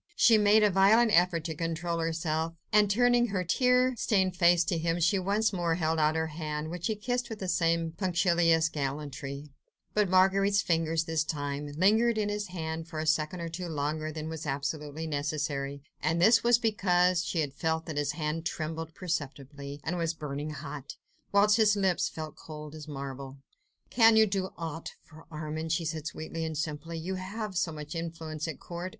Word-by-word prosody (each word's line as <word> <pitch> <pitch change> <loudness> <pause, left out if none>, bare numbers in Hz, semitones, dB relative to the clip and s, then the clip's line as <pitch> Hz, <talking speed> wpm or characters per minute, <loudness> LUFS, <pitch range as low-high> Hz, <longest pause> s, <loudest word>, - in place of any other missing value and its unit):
She 230 - +6
made 210 +1 +5
a 210 - +4
violent 215 +5 +5
effort 175 -1 +3
to 160 0 -3
control 165 +1 -2
herself, 165 0 -1 0.2
and 210 -1 +5
turning 245 +3 +3
her 195 -4 -1
tear 250 +6 +3
stained 190 -5 +1
face 175 -1 +5
to 170 -2 -1
him, 165 +1 0
she 170 +4 +3
once 205 +4 +1
more 170 -3 0
held 160 -1 0
out 155 +1 +3
her 160 0 0
hand, 155 0 -4
which 175 -1 -3
he 220 - -1
kissed 245 +3 -2
with 225 - -5
the 190 - -5
same 165 -1 +1
punctilious 170 -2 +2
gallantry; 140 -1 -5 0.4
but 210 -3 +2
Marguerite's 195 +2 +4
fingers, 165 -2 +1
this 160 -1 0
time, 145 -2 -3
lingered 220 +6 +4
in 210 -1 0
his 205 0 -3
hand 160 -2 -5
for 165 -2 -8
a 155 - -2
second 155 +2 0
or 170 - -3
two 175 +2 -5
longer 155 0 -2
than 155 0 -5
was 160 -1 -6
absolutely 150 +2 -3
necessary, 145 -2 -3 0.2
and 160 +3 +1
this 220 +6 +5
was 240 0 +5
because 180 -6 +2
she 170 -1 -1
had 145 -3 -3
felt 160 +2 -1
that 155 -3 -5
his 145 -1 0
hand 155 0 -3
trembled 160 0 -4
perceptibly 145 -4 -5
and 175 +2 -2
was 165 0 -1
burning 150 -1 -5
hot, 145 -2 -7 0.4
whilst 205 +1 +5
his 215 -2 +4
lips 190 -3 +1
felt 155 -1 -7
as - - -17
cold 150 -1 -8
as 155 -1 -9
marble. 135 -1 -7 0.5
"Can 225 -2 +6
you 220 0 +7
do 190 -2 -2
aught 165 -1 -6
for 160 0 -16
Armand?" 155 0 -4
she 165 +1 0
said 155 0 -3
sweetly 165 0 -5
and 160 -1 -3
simply. 160 +2 -4
"You 175 +4 -4
have 205 +1 -5
so 175 -1 0
much 150 0 -7
influence 165 -1 -5
at 160 - -6
court 175 +1 -6
165 Hz, 190 wpm, -29 LUFS, 155-190 Hz, 0.5 s, you